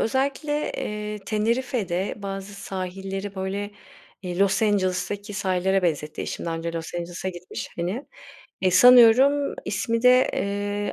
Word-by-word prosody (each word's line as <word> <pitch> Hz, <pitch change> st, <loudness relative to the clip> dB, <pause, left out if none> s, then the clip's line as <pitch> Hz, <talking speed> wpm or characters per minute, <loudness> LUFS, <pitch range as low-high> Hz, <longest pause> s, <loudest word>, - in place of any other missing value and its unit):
Özellikle, 280 Hz, +5 st, -1 dB
eee, 210 Hz, 0 st, -4 dB
Tenerife'de 215 Hz, -4 st, -1 dB
bazı 200 Hz, 0 st, -6 dB
sahilleri, 195 Hz, +1 st, -5 dB
böyle, 195 Hz, +2 st, -3 dB, 0.5 s
eee, 180 Hz, 0 st, -4 dB
Los 200 Hz, +2 st, +3 dB
Angeles'taki 205 Hz, 0 st, 0 dB
sahillere 190 Hz, 0 st, +1 dB
benzetti 155 Hz, -3 st, -1 dB
eşim, -, -, -5 dB
daha 165 Hz, 0 st, -2 dB
önce 165 Hz, 0 st, -4 dB
Los 165 Hz, 0 st, -6 dB
Angeles'a 175 Hz, +2 st, -4 dB
gitmiş, 180 Hz, 0 st, -7 dB
hani. 185 Hz, +11 st, -3 dB, 0.6 s
E, 185 Hz, -, +4 dB
sanıyorum 250 Hz, +7 st, +6 dB
ismi 230 Hz, +3 st, -1 dB
de, 250 Hz, +1 st, +5 dB
eee, 205 Hz, 0 st, -2 dB
200 Hz, 125 wpm, -24 LUFS, 185-225 Hz, 0.6 s, sanıyorum